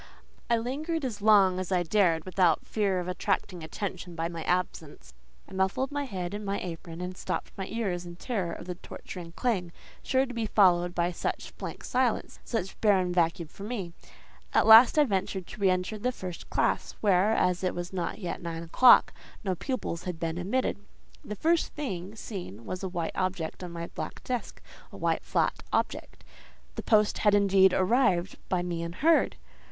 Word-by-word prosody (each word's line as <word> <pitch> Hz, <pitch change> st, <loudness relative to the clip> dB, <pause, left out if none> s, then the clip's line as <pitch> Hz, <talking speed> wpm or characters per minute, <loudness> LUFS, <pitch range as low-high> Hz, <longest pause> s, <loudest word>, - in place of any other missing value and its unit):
I 235 Hz, -, +4 dB
lingered 290 Hz, +7 st, -2 dB
as 215 Hz, -5 st, -4 dB
long 200 Hz, -3 st, +5 dB
as 185 Hz, 0 st, -4 dB
I 180 Hz, -1 st, +2 dB
dared 170 Hz, -3 st, +2 dB
without 185 Hz, -3 st, +2 dB
fear 200 Hz, -4 st, 0 dB
of 180 Hz, -, -4 dB
attracting 185 Hz, -1 st, -2 dB
attention 180 Hz, +1 st, -5 dB
by 165 Hz, 0 st, -2 dB
my 170 Hz, -1 st, -6 dB
absence. 155 Hz, -, -2 dB, 0.3 s
I -, -, -13 dB
muffled 190 Hz, +8 st, 0 dB
my 285 Hz, 0 st, -2 dB
head 185 Hz, -6 st, -4 dB
in 210 Hz, +1 st, -4 dB
my 200 Hz, 0 st, -2 dB
apron, 170 Hz, -1 st, -7 dB
and 180 Hz, +1 st, -5 dB
stopped -, -, -4 dB
my 190 Hz, -1 st, -5 dB
ears 195 Hz, -6 st, -2 dB
in 175 Hz, -1 st, -9 dB
terror 190 Hz, -3 st, -3 dB
of 170 Hz, -, -7 dB
the 180 Hz, -, -4 dB
torturing 175 Hz, -1 st, -9 dB
clang, 185 Hz, -6 st, -1 dB, 0.3 s
sure 265 Hz, 0 st, +2 dB
to 250 Hz, -, -8 dB
be 230 Hz, -2 st, -2 dB
followed 175 Hz, -4 st, +4 dB
by 175 Hz, +1 st, +1 dB
such 170 Hz, -, -4 dB
blank -, -, -6 dB
silence, 250 Hz, -2 st, 0 dB
such 205 Hz, -6 st, -4 dB
barren 190 Hz, -4 st, +3 dB
vacuum 170 Hz, -1 st, +1 dB
for 175 Hz, -, -15 dB
me. 200 Hz, -6 st, -4 dB, 0.6 s
At -, -, +5 dB
last 225 Hz, +6 st, +9 dB
I 300 Hz, -, +7 dB
ventured 190 Hz, -5 st, -1 dB
to 205 Hz, -, -11 dB
re 195 Hz, -, +5 dB
enter 185 Hz, +4 st, -1 dB
the 250 Hz, +4 st, 0 dB
first 185 Hz, -7 st, -8 dB
classe, -, -, 0 dB
where, 200 Hz, +1 st, +4 dB
as 180 Hz, -3 st, +1 dB
it 185 Hz, -, 0 dB
was 175 Hz, +1 st, -5 dB
not 175 Hz, -2 st, -2 dB
yet 180 Hz, -5 st, -5 dB
nine 165 Hz, -1 st, -5 dB
o'clock, 240 Hz, +9 st, +6 dB, 0.3 s
no 190 Hz, -2 st, 0 dB
pupils 180 Hz, -, -4 dB
had 180 Hz, -3 st, -4 dB
been 165 Hz, +1 st, -2 dB
admitted. 205 Hz, +5 st, -1 dB, 0.4 s
The 210 Hz, -, -6 dB
first 330 Hz, -, +1 dB
thing 200 Hz, -9 st, -4 dB
seen 175 Hz, -, -7 dB
was 185 Hz, -, -5 dB
a 190 Hz, -, -3 dB
white 170 Hz, -2 st, -3 dB
object 185 Hz, -2 st, -2 dB
on 180 Hz, -, -5 dB
my 170 Hz, 0 st, -5 dB
black -, -, -7 dB
desk, 250 Hz, -2 st, -4 dB, 0.3 s
a -, -, -10 dB
white, -, -, 0 dB
flat -, -, 0 dB
object. -, -, -2 dB, 0.5 s
The -, -, -5 dB
post 210 Hz, -2 st, +3 dB
had, 210 Hz, -1 st, +4 dB
indeed, 195 Hz, -2 st, +5 dB
arrived; 190 Hz, -2 st, +2 dB
by 180 Hz, -1 st, +1 dB
me 175 Hz, -2 st, -3 dB
unheard. 225 Hz, -, +2 dB
185 Hz, 185 wpm, -28 LUFS, 175-215 Hz, 0.6 s, last